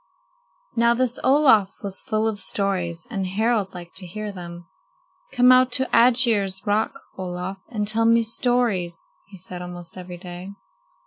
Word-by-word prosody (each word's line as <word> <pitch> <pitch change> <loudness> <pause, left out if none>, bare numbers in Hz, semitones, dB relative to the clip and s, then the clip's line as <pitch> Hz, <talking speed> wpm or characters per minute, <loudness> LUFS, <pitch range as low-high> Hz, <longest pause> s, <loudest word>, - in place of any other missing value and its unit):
Now 235 0 +4
this 250 0 0
Olaf 260 -8 +4
was 195 -1 -2
full 220 -3 0
of 215 -2 -3
stories, 185 -3 -2
and 195 -4 -2
Harald 210 0 0
liked 175 -1 -10
to 185 -2 -8
hear 210 +4 -5
them. 175 -2 -9 0.7
"Come 250 0 +5
out 255 0 +5
to 260 0 +1
Aegir's 230 -6 +3
Rock, 210 +2 0 0.2
Olaf, 180 +1 -5
and 210 -4 -2
tell 225 +2 +1
me 230 0 +5
stories," 225 -7 0 0.3
he 195 -1 -13
said 180 0 -7
almost 175 -1 -7
every 180 -1 -8
day. 180 +2 -9
200 Hz, 150 wpm, -23 LUFS, 180-235 Hz, 0.7 s, Come